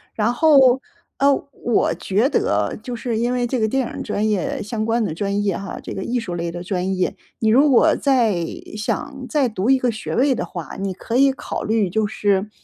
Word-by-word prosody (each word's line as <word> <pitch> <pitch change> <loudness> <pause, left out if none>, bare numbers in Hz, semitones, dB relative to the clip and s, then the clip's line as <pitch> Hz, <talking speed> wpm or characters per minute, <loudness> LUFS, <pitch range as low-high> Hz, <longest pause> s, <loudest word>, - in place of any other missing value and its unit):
然 220 +2 +1
后， 265 -4 +5 0.4
呃， 280 0 +5 0.2
我 240 -2 0
觉 210 +7 +1
得 100 - 0
就 245 0 -5
是 230 -1 -3
因 240 +2 0
为 245 -1 0
这 250 0 -1
个 220 - +2
电 265 +1 0
影 - - -5
专 215 0 -1
业 275 +6 -1
相 215 +1 -3
关 230 +1 +1
的 160 - -2
专 200 +4 -1
业 195 -3 0
哈， 195 - -6
这 - - -6
个 190 - -4
艺 245 +1 -1
术 180 -6 -5
类 170 0 -3
的 175 0 -6
专 185 0 -1
业， 185 - 0 0.2
你 220 - +2
如 275 +6 +5
果 310 +6 +5
再 230 - +2 0.3
想 275 +5 -3
再 280 -6 +2
读 210 +2 -2
一 270 - +6
个 250 -2 +1
学 220 -1 -5
位 265 +1 +3
的 - - -3
话， 170 -3 -7
你 195 -1 -2
可 230 +6 -3
以 275 0 +5
考 - - -5
虑， 215 -4 +1
就 215 +3 0
是 205 0 0
225 Hz, 240 characters per minute, -21 LUFS, 200-260 Hz, 0.4 s, 一